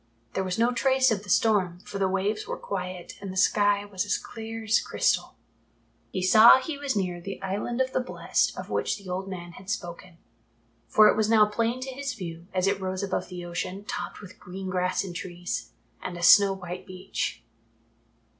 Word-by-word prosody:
There 190 - 0
was 185 -1 -2
no 235 +2 +3
trace 265 0 +3
of 205 -3 0
the 205 - -12
storm, 190 -4 +3
for 200 - -7
the 195 - +2
waves 200 +3 -1
were - - -3
quiet 180 -2 -5
and 195 -2 -5
the 190 - -7
sky 205 +1 +3
was 195 -3 -3
as 205 - 0
clear 225 0 -7
as 220 +1 +3
crystal. - - 0 0.7
He 185 - -3
saw 215 +5 +9
that 260 - 0
he 320 - -4
was 280 -4 -1
near 180 -3 -1
the 195 +3 -6
Island 205 +6 -2
of 260 0 -1
the - - +2
Blest 250 - 0
of - - -7
which - - 0
the 200 -2 -13
old 190 +2 -3
man 175 -2 -7
had 190 +3 -12
spoken, 175 -3 -5 0.7
for 215 0 +6
it - - +4
was 215 0 +1
now 220 -2 +6
plain 230 +4 -1
to 265 +1 -4
his 280 0 -4
view, 170 -3 -7
as 185 0 0
it 195 0 +1
rose 185 +1 -3
above 190 -2 -2
the 180 -1 -7
ocean, 180 +3 -4
topped 205 0 -5
with 195 -3 -12
green 185 +1 -6
grass 180 +1 0
and 180 -3 -7
trees, 175 0 -5 0.3
and 175 - -5
a 175 - -6
snow 200 +2 +8
white 185 -1 -6
beach. 185 0 -4
195 Hz, 205 wpm, -27 LUFS, 185-215 Hz, 0.7 s, saw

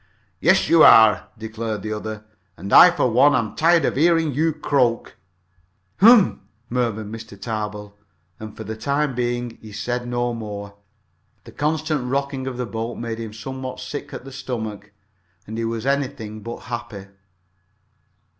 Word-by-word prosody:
"Yes, - - +3
you 165 -1 +5
are!" 110 -1 +7
declared 110 -1 -5
the 110 0 -3
other. 110 0 -6 0.3
"And 95 +4 -6
I, 180 - +10
for 170 -8 0
one, 140 +6 +5
am 115 -4 -1
tired 170 +1 +3
of - - -1
hearing 165 -1 +3
you 160 +4 +1
croak." 125 -6 0 0.8
"Hum!" 220 -1 +6 0.3
murmured 110 -4 -2
Mr. 110 -3 -9
Tarbill, 105 -2 -5 0.4
and 110 - -7
then, - - -17
for 110 - -7
the 110 +1 -6
time 140 +4 -1
being, 120 -1 -3
he 110 - -11
said 120 +3 -3
no 120 0 -1
more. 100 -3 -7 0.7
The - - -13
constant 150 -3 -1
rocking 135 0 -2
of 130 -2 -5
the 125 - -2
boat 115 +2 -5
made 115 -1 -5
him 115 -2 -6
somewhat 130 +4 -7
sick 130 +3 -7
at - - -8
the 135 - -9
stomach, 110 -6 -6 0.5
and 110 - -7
he 115 - -1
was 115 +1 -3
anything 135 -6 -2
but 115 +2 -7
happy. 115 -5 -7
120 Hz, 160 wpm, -22 LUFS, 110-135 Hz, 0.8 s, I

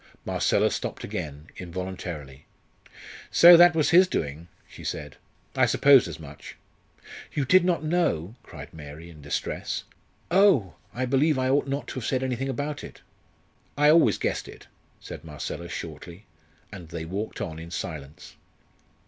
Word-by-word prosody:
Marcella - - +1
stopped - - -4
again, 75 0 -6
involuntarily. 85 -6 -7 0.8
"So 175 +1 +9
that 175 0 +7
was 155 -2 +2
his 185 +2 +7
doing?" 80 - -4 0.2
she - - -13
said. - - -5 0.4
"I - - +4
supposed 140 -6 +5
as 85 -2 -8
much." 75 -2 -11 0.8
"You 145 -3 -1
did 185 +7 +5
not 175 -3 0
know?" 155 - 0
cried - - -11
Mary, 80 +2 -10
in 75 -2 -14
distress. 70 0 -3 0.5
"Oh! 170 - +4 0.2
I 125 +5 -2
believe 140 +4 +2
I 130 0 0
ought 140 +1 +2
not 140 +1 -3
to - - -5
have 115 - -6
said 130 -1 0
anything 130 +1 -2
about 145 +3 -4
it." - - -11 0.8
"I 150 +1 +5
always 165 +1 +4
guessed - - -2
it," - - -13 0.3
said - - -9
Marcella, 80 +2 -6
shortly, 85 +5 -8 0.5
and 90 -6 -10
they 80 -1 -6
walked 100 +6 -5
on 80 0 -5
in 85 +1 -9
silence. 75 -4 -7
100 Hz, 150 wpm, -26 LUFS, -, 0.8 s, So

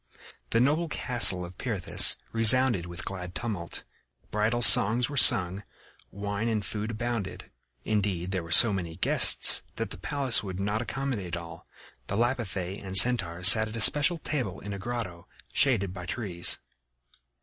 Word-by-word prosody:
The 115 - -1
noble 150 +7 -1
castle 115 -11 +3
of 90 +1 -15
Pirithous 95 -8 +1
resounded 115 -4 +3
with 85 +1 -9
glad 90 -2 -9
tumult; 100 -9 -7 0.5
bridal 110 +3 -1
songs 120 +3 +5
were - - -8
sung; 95 -6 +2 0.5
wine 100 +3 -6
and 105 -3 -4
food 105 +1 -6
abounded. 115 -3 -7 0.3
Indeed, 95 -4 -3
there 95 -2 -4
were 85 - -13
so 105 +6 +7
many 85 -4 -7
guests - - +5
that - - -6
the - - -8
palace 140 -4 0
would 95 -2 -9
not 105 +3 -4
accommodate 120 -9 -6
all. 85 -1 -13 0.4
The 100 - -5
Lapithæ 105 -6 -4
and 95 0 0
Centaurs 95 -7 +5
sat 110 +2 +5
at 110 - -10
a - - -6
special 150 +8 +2
table 130 - -6
in 100 +1 -9
a 100 - -8
grotto 105 -6 -8 0.3
shaded 100 -9 -1
by 90 -1 -10
trees. 95 -4 -1
105 Hz, 155 wpm, -25 LUFS, 90-120 Hz, 0.5 s, so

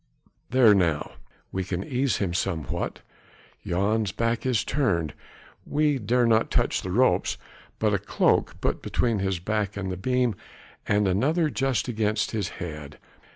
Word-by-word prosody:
There! 125 -4 +6
now 85 -6 +1 0.4
we 95 - -2
can 90 0 -3
ease 130 +1 0
him 95 -4 -1
somewhat. 85 -5 -2 0.6
Jan's 100 +3 0
back 115 +3 -1
is 120 -6 +2
turned: 85 - 0 0.5
we 150 -2 +1
dare 120 +3 +2
not 115 -1 +3
touch - - +1
the 95 - -5
ropes, 125 +8 +2 0.4
but 105 -2 +1
a 100 - +2
cloak 100 - +1
put - - -1
between 115 -4 0
his 95 -1 0
back 105 +2 -2
and 95 -2 -3
the 95 - -4
beam, 125 +3 +1 0.5
and 105 0 +2
another 150 - +1
just 135 -5 0
against 110 -2 0
his 105 -6 -2
head. 75 -4 -7
105 Hz, 150 wpm, -26 LUFS, 95-125 Hz, 0.6 s, There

